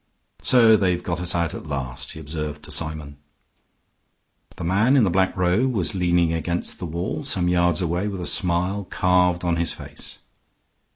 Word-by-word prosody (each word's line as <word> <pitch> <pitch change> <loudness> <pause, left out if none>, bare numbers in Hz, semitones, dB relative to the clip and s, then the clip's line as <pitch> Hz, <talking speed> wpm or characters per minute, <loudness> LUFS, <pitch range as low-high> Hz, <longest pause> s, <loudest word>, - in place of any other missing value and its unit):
"So 115 -3 +6
they've 90 -4 0
got 85 -1 -3
at 90 0 -1
us 85 -2 0
at - - -8
last," 70 -1 -4
he - - -9
observed 75 -1 -5
to 75 - -6
Symon. 75 -3 -2 1.4
The - - -7
man 105 +10 +3
in 125 - +5
the 95 - +2
black 95 +1 +1
robe 95 +9 +1
was 95 -7 0
leaning 85 -3 +1
against 85 +2 -3
the 90 - -5
wall 85 - -4
some 95 -10 0
yards 90 -1 +2
away, 90 +4 -1
with 100 -3 -5
a - - -4
smile 90 +2 +1
carved 90 -1 +1
on 85 -1 0
his 85 0 +1
face. - - -5
90 Hz, 175 wpm, -23 LUFS, 80-95 Hz, 1.4 s, So